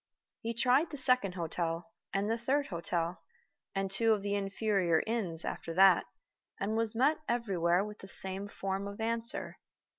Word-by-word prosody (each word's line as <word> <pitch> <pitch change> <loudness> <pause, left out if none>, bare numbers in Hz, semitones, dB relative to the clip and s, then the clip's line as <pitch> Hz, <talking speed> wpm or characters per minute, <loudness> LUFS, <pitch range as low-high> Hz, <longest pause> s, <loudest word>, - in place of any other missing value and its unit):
He 230 +1 -4
tried 255 +7 +3
the 295 - -7
second 250 -8 +3
hotel, 170 +2 -3 0.2
and 195 +1 0
the 225 - +1
third 265 +5 0
hotel, 170 -1 -2 0.5
and 195 0 -1
two 225 +3 +3
of 205 -2 -2
the 200 0 -1
inferior 195 -4 +1
inns 195 -8 -1
after 165 - -5
that, 190 0 +6 0.5
and 210 +3 -1
was 225 0 +2
met 275 +7 +3
everywhere 190 -6 +1
with 210 0 -9
the 195 - -10
same 190 +1 +1
form 195 0 -3
of 200 +1 -8
answer. 230 +1 -1
200 Hz, 160 wpm, -32 LUFS, 185-230 Hz, 0.5 s, that